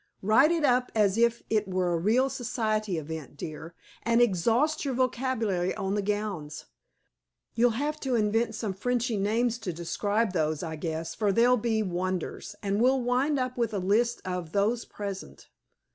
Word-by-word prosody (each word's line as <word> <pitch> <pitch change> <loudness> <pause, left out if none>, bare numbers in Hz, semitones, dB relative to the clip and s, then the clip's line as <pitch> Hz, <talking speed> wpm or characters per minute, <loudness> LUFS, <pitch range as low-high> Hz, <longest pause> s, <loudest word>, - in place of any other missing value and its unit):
"Write 220 +9 +5
it 335 -2 0
up 250 -1 +2
as 205 -3 +3
if 235 +1 +2
it 215 -2 +1
were 185 -2 0
a - - +1
real 230 +9 +3
society 215 -6 -1
event, 155 -2 -6
dear, 160 +2 -7 0.3
and 230 +1 +2
exhaust 240 - +2
your 270 -3 -2
vocabulary 235 -8 0
on 195 -2 -2
the 205 - +1
gowns. 200 -7 -3 0.9
You'll 230 0 +2
have 300 +3 -2
to 265 -4 -1
invent 220 +1 +1
some 215 -3 -3
Frenchy 240 +3 -1
names 230 +4 +1
to 190 - -3
describe 205 +5 -1
those, 155 -2 0
I 160 -2 -4
guess, 160 +1 -4
for 210 -2 +1
they'll 240 +5 +4
be 220 -2 0
wonders; 185 +2 -3
and 200 +1 0
we'll 260 +2 +4
wind 255 +4 +1
up 255 -1 -2
with 225 -2 0
a - - 0
list 215 +6 +1
of 180 -3 -4
'those 220 +4 +1
present.'" 200 -2 -7
215 Hz, 170 wpm, -28 LUFS, 185-240 Hz, 0.9 s, Write